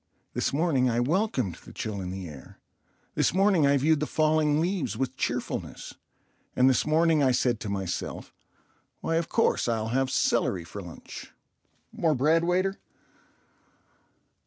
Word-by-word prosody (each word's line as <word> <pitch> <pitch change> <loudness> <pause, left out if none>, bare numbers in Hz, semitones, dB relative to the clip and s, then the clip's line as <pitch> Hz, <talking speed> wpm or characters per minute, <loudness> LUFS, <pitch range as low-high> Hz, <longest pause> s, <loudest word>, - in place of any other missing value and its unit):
This - - 0
morning 140 -4 +2
I 120 0 0
welcomed 135 - 0
the - - -12
chill 105 -3 -4
in 90 - -5
the 95 -1 -6
air; 75 -4 -12 0.5
this - - +1
morning 190 -6 +4
I 140 0 +4
viewed 155 +3 +3
the 150 - -1
falling 155 -1 +2
leaves 175 - -1
with 130 0 -2
cheerfulness; 120 -1 -4 0.6
and 125 - +4
this 130 +2 +2
morning 160 0 +3
I 135 - +4
said 120 -2 +1
to 110 - -5
myself, 95 -3 -4 0.7
"Why, 165 - 0
of 165 - -2
course, 230 - +1
I'll 110 -1 -1
have 130 +2 +1
celery 90 -7 +1
for 100 +5 -8
lunch." 85 -3 -10 0.6
("More 160 -3 +1
bread, 155 +6 +3
waiter.") 185 +3 0
135 Hz, 150 wpm, -27 LUFS, 115-165 Hz, 0.7 s, morning